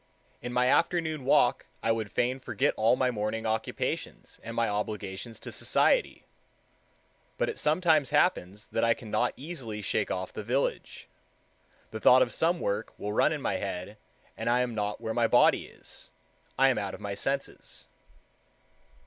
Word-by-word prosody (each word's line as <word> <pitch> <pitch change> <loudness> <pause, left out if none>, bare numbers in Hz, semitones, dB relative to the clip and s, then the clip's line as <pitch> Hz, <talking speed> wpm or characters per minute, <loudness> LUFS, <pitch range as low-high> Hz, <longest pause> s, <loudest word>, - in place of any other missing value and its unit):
In 125 - -5
my 125 0 +2
afternoon 160 -2 +1
walk 135 - +3 0.2
I 115 - +2
would 110 -3 -2
fain 125 +2 0
forget 135 +2 0
all 110 +3 +3
my 130 0 +1
morning 110 0 -3
occupations 110 0 -3
and 115 0 -7
my 115 -1 +2
obligations 105 +1 -4
to - - -7
society. - - +1 1.1
But - - 0
it - - -4
sometimes 155 -3 +3
happens 105 - +1
that 115 - -1
I 115 0 +4
cannot 120 +2 -1
easily 130 -8 -6
shake 105 - 0
off 95 0 -3
the 110 - -5
village. 125 +6 -2 0.8
The 110 - -5
thought 130 +3 +7
of 120 - -4
some 170 +1 +1
work 105 -2 -3
will 105 0 -4
run 130 - +3
in 150 -3 -3
my - - 0
head 95 +1 -5 0.4
and - - -2
I 125 +1 +3
am 125 -1 -1
not 105 -1 -3
where 110 - -3
my 115 0 +2
body - - +4
is—I 135 +1 -3
am 130 - +1
out 100 -2 -4
of - - -12
my 100 -1 -4
senses. 135 +7 -3
115 Hz, 165 wpm, -29 LUFS, 105-135 Hz, 1.1 s, thought